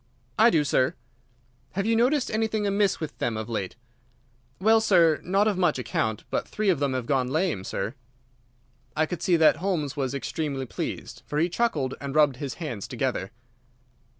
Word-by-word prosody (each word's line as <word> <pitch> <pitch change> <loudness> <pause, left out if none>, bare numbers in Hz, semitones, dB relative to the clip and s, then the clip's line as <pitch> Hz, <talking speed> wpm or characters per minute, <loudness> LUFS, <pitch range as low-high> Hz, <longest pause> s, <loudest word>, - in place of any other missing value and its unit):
"I 225 +2 +8
do, 160 -8 +3
sir." 130 -2 +1 0.8
"Have 195 +1 -1
you 225 +1 +2
noticed 255 +4 +2
anything 220 -1 0
amiss 200 0 +1
with 155 -2 -5
them 115 -2 -1
of 110 0 -4
late?" 105 -5 -3 0.8
"Well, 220 +3 +5
sir, 170 -7 +4
not 195 +4 +2
of 200 -4 0
much 180 - +2
account; 110 -3 -2
but - - -1
three 215 -1 -1
of 175 -7 +2
them 140 -2 0
have 130 -2 -2
gone 130 -1 +1
lame, 155 - 0
sir." 100 +3 -3 1.0
I 155 - +2
could 175 +2 -5
see 180 - +3
that 160 -1 +5
Holmes 160 -5 -1
was 135 -2 -2
extremely 140 -1 -3
pleased, - - -5
for 145 - -3
he 165 +3 +2
chuckled 165 - 0
and 140 0 -5
rubbed 145 -4 +4
his 135 -1 -5
hands 125 - -5
together. 95 - -2
155 Hz, 180 wpm, -26 LUFS, 130-195 Hz, 1.0 s, I